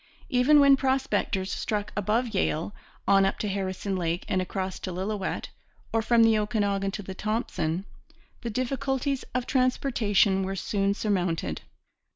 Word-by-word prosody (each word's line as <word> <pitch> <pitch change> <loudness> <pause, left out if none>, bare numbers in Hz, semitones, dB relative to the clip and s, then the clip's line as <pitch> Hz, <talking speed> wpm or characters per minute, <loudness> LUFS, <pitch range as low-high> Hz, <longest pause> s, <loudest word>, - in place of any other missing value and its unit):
Even 255 +4 +5
when 280 -1 +7
prospectors 260 -8 0
struck 210 -3 -2
above 215 +4 +1
Yale, 190 -3 -1 0.3
on 195 0 +5
up 195 - +1
to 210 - -2
Harrison 195 0 -2
Lake 170 -1 -2
and 185 - +1
across 190 0 -3
to 185 - -5
Lillooet, 190 +2 -3 0.4
or 225 - +3
from 230 +1 +4
the 225 -1 +5
Okanagan 205 -2 0
to 205 +1 -5
the 190 - -6
Thompson, 195 -4 -2 0.6
the 235 - -3
difficulties 265 +3 -1
of 250 -1 0
transportation 230 -7 +2
were 190 0 -2
soon 200 +1 0
surmounted. 185 -6 -1
205 Hz, 145 wpm, -27 LUFS, 190-240 Hz, 0.6 s, when